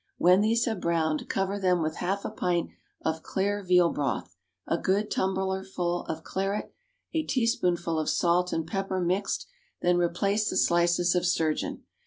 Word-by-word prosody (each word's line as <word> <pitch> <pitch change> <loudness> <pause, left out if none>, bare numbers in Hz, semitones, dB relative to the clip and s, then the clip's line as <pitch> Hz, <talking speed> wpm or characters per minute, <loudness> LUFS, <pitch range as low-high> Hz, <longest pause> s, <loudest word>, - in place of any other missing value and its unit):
When 180 +3 +5
these 230 +2 +2
have 220 -6 -2
browned, 160 -2 0
cover 195 +1 -1
them 180 -3 +2
with 155 0 -2
half 195 +2 -2
a - - -3
pint 175 -5 -1 0.3
of 160 0 0
clear 205 +4 -1
veal 180 -2 +4
broth, 125 -10 -2 0.3
a 165 - 0
good 200 +3 0
tumblerful 190 -2 -1
of 160 0 -4
claret, 195 +4 -3 0.4
a 320 - +2
teaspoonful 180 - 0
of 155 - -1
salt 180 +1 +2
and 165 - -1
pepper 190 +2 -2
mixed, 185 +3 -1 0.4
then 175 0 +3
replace 195 +5 +1
the - - -1
slices 175 0 +3
of 180 0 +1
sturgeon. 160 -3 0
180 Hz, 160 wpm, -28 LUFS, 170-195 Hz, 0.4 s, When